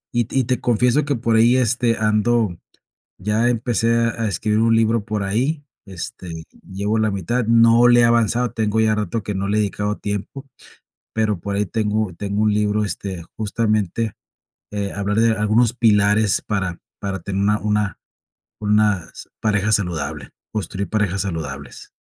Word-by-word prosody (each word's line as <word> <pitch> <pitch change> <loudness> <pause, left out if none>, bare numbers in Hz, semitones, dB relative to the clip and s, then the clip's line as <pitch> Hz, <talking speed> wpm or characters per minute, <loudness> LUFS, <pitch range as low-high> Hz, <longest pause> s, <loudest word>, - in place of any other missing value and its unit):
y 120 -2 +1
y 130 - +2
te 125 +1 -1
confieso 125 +4 +2
que 145 - 0
por 115 0 0
ahí, 120 +3 +5
este, 120 -1 +2
ando 105 -2 +1 0.6
ya 105 +4 +1
empecé 115 -1 +1
a 115 -1 0
a - - +1
escribir 105 +2 0
un 115 0 +3
libro 115 -1 +2
por 105 -3 -3
ahí, 130 +10 -1 0.2
este, 90 -4 -7 0.2
llevo 100 +3 -2
la 110 -1 +1
mitad, 100 +6 -1
no 115 +1 +5
le 120 0 +6
he 120 - +5
avanzado, 120 +1 +2
tengo 110 0 0
ya 110 -1 +3
rato 105 +1 -2
que 105 0 -4
no 100 +1 -2
le 105 - +1
he - - +3
dedicado 105 0 -2
tiempo, 105 +7 -5 0.7
pero 110 -3 0
por 100 +3 -4
ahí 105 -1 0
tengo 105 -2 -1
tengo 100 +3 -2
un 105 -1 +2
libro, 105 0 +1
este, 95 -2 -5
justamente, 110 -1 -1 0.6
eh, 100 -1 -3
hablar 100 +1 -1
de 115 0 +4
algunos 110 +2 +2
pilares 105 -3 +3
para 95 -5 -2 0.2
para 95 -1 -3
tener 95 +3 -3
una 105 +1 +2
una 105 -1 -1 0.6
unas 105 -4 0
pareja 105 -1 +1
saludable, 90 -8 -1 0.2
construir 100 -2 -4
parejas 105 -3 0
saludables. 75 -7 -6
105 Hz, 165 wpm, -20 LUFS, 100-115 Hz, 0.7 s, le